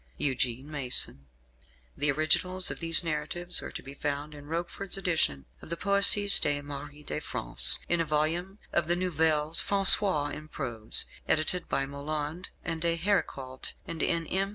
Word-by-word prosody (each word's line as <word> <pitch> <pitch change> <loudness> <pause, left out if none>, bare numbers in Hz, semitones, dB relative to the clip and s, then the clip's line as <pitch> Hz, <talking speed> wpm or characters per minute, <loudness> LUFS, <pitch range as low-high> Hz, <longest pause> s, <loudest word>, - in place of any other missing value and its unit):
EUGENE 130 0 -1
MASON. 125 - +1 0.7
The 145 +1 0
originals 180 +5 +1
of - - -7
these 165 +1 +6
narratives 165 +3 0
are - - -7
to - - -8
be 135 - -10
found 145 +1 -5
in 145 -1 -12
Roquefort's 175 +4 -3
edition 160 - -1 0.2
of - - -12
the 170 - -3
Poésies 200 +1 +4
de 145 0 0
Marie 145 +1 -9
de 150 - -5
France; - - +3
in 175 -1 +1
a - - -1
volume 160 +6 -2 0.2
of 170 -2 0
the 175 - +1
Nouvelles 160 -3 +1
Françoises 190 -6 +4
en 155 0 -9
Prose, 120 -8 +1 0.2
edited 160 +3 -1
by 135 - -1
Moland 150 +4 -5 0.2
and 165 -1 -4
D'Héricault; 165 -7 -2
and 160 - -6
in 170 -1 -1
M. 195 +4 -2
155 Hz, 155 wpm, -28 LUFS, 145-175 Hz, 0.7 s, these